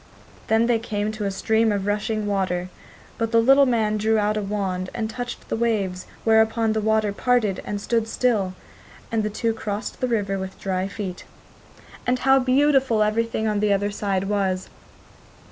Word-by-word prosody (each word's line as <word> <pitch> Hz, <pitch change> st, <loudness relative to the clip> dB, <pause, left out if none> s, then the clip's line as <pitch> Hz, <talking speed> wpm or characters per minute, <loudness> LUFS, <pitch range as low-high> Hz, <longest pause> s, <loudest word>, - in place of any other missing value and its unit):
Then 225 Hz, +1 st, +3 dB
they 235 Hz, -1 st, +2 dB
came 210 Hz, -2 st, -2 dB
to 215 Hz, -1 st, -4 dB
a -, -, +1 dB
stream 220 Hz, +3 st, +1 dB
of 200 Hz, -2 st, -1 dB
rushing 210 Hz, +1 st, -1 dB
water; 185 Hz, -3 st, -1 dB, 0.5 s
but 225 Hz, -1 st, -1 dB
the 230 Hz, -, +5 dB
little 270 Hz, +4 st, +6 dB
man 220 Hz, -3 st, +1 dB
drew 220 Hz, +1 st, +2 dB
out 210 Hz, 0 st, +1 dB
a 215 Hz, -, -1 dB
wand 195 Hz, -2 st, -2 dB
and 225 Hz, -2 st, -1 dB
touched 245 Hz, +2 st, -6 dB
the -, -, -2 dB
waves, 205 Hz, -6 st, -1 dB, 0.2 s
whereupon 220 Hz, 0 st, +3 dB
the 220 Hz, -, 0 dB
waters 215 Hz, -1 st, +1 dB
parted 230 Hz, -6 st, +1 dB
and 205 Hz, -, -3 dB
stood 225 Hz, +2 st, 0 dB
still, 215 Hz, -7 st, 0 dB, 0.6 s
and 225 Hz, -1 st, +1 dB
the 210 Hz, -, -1 dB
two 225 Hz, +2 st, -1 dB
crossed 210 Hz, -1 st, -5 dB
the 255 Hz, -, +1 dB
river 200 Hz, -5 st, -1 dB
with 190 Hz, 0 st, -7 dB
dry 190 Hz, -1 st, -1 dB
feet. 195 Hz, -3 st, -6 dB, 0.8 s
And 250 Hz, +1 st, +2 dB
how 270 Hz, +1 st, +4 dB
beautiful 265 Hz, -3 st, +3 dB
everything 220 Hz, +1 st, 0 dB
on 210 Hz, -1 st, 0 dB
the 210 Hz, 0 st, +2 dB
other 200 Hz, +1 st, +1 dB
side 200 Hz, -2 st, -1 dB
was! 195 Hz, -2 st, -1 dB
215 Hz, 180 wpm, -23 LUFS, 200-230 Hz, 0.8 s, little